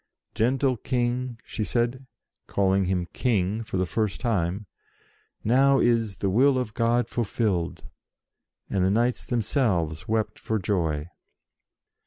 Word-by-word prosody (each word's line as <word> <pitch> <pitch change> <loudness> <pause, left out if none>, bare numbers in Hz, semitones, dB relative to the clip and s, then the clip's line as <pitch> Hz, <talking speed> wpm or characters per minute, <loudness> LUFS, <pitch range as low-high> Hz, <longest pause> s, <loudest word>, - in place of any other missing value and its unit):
"Gentle 130 +2 +1
King," 125 0 -1
she 110 - -3
said, 120 +4 -1 0.4
calling 95 -1 +2
him 90 -1 0
"King" 105 -3 0
for 100 - -4
the 95 - +1
first 105 +2 -1
time, 100 -4 -1 0.8
"now 135 +4 +4
is 115 -5 +2
the 100 - -1
will 130 +6 +4
of 125 -4 -2
God 115 0 +1
fulfilled!" 105 -7 -1 0.8
and 95 - 0
the 95 - +3
knights 120 +4 +1
themselves 105 - 0
wept 110 0 -1
for 110 - -1
joy. 85 -6 -1
110 Hz, 125 wpm, -26 LUFS, 95-120 Hz, 0.8 s, now